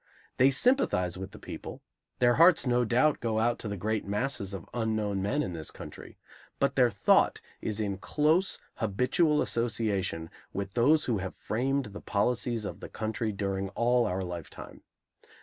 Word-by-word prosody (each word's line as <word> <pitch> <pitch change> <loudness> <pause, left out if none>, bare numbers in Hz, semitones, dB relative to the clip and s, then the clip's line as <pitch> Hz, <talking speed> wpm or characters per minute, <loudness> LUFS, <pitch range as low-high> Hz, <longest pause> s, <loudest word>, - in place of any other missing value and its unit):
They 130 +2 +6
sympathize 135 - +2
with 95 - -6
the - - -13
people; - - -8 0.3
their 120 -1 +4
hearts 175 -2 +6
no 125 -1 +2
doubt 130 +6 +2
go 115 -2 -1
out 120 +2 +1
to - - -6
the 100 -1 -4
great 110 +3 -1
masses 105 0 -1
of 95 -4 -6
unknown 110 -4 -1
men 130 +10 0
in 90 - -4
this 80 -2 -4
country; - - -11 0.4
but - - +1
their - - +5
thought - - +3 0.2
is 110 0 -2
in 100 -3 -2
close, 155 - +2 0.2
habitual 125 - +2
association 105 -8 -1 0.2
with 100 0 -4
those 145 +6 +4
who 115 -5 0
have 95 0 -5
framed 135 +4 -1
the 105 - -8
policies 115 +1 0
of - - -6
the - - -8
country 110 0 -2
during 100 -1 -2
all 120 0 +3
our 95 -1 -2
lifetime. 85 -3 -8
110 Hz, 165 wpm, -29 LUFS, 100-125 Hz, 0.4 s, They